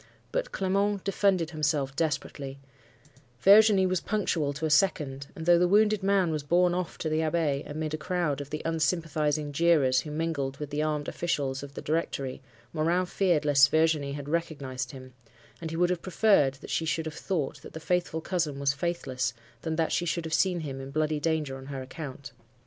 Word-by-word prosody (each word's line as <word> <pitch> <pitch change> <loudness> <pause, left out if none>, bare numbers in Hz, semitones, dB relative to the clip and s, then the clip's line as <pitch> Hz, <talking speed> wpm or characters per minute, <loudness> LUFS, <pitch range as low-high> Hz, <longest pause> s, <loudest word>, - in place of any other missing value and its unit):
But - - -2
Clement 200 - 0
defended 190 -4 +1
himself 150 -4 -1
desperately: 145 -3 -2 0.8
Virginie 200 - +6
was 185 -2 0
punctual 170 -9 0
to 150 +3 -3
a - - 0
second; 150 -6 +1
and, 160 - -6
though 175 0 +6
the 180 - +4
wounded 210 +2 +4
man 195 -3 +2
was 155 -1 -1
borne 175 +4 +3
off 180 -2 -3
to - - -3
the 155 0 +1
Abbaye, 155 -3 0
amid 155 +1 -3
a - - -1
crowd 155 -3 -1
of 140 - -8
the 150 +1 -5
unsympathising 155 -2 0
jeerers 145 -4 +3
who 155 - -8
mingled 150 -3 -2
with 150 -1 -6
the 145 +1 -1
armed 150 -1 -1
officials 140 -6 -2
of 140 0 -10
the - - -6
Directory, 140 -4 -2 0.3
Morin 170 +3 +1
feared 175 -5 +1
lest 145 -1 +6
Virginie 155 -3 +2
had 145 -1 -6
recognized 140 -6 -3
him; 130 -1 -11 0.5
and 165 - -4
he 165 - -4
would 175 +1 +3
have 180 -2 -2
preferred 185 -8 +3
that - - -8
she 165 - 0
should 160 0 -1
have 160 - -4
thought 160 -4 -3
that - - -12
the 160 - -6
'faithful 175 -1 -1
cousin' 160 -6 -2
was 140 0 +2
faithless, 140 -5 -2 0.3
than 160 -1 -2
that 160 0 0
she 175 - 0
should 165 +1 -1
have 160 - -4
seen 180 -2 +2
him 135 -3 -5
in 135 - -7
bloody 155 +1 0
danger 150 -4 -1
on 135 0 -11
her 135 -2 -5
account. 135 -1 -8
155 Hz, 195 wpm, -28 LUFS, 140-175 Hz, 0.8 s, Virginie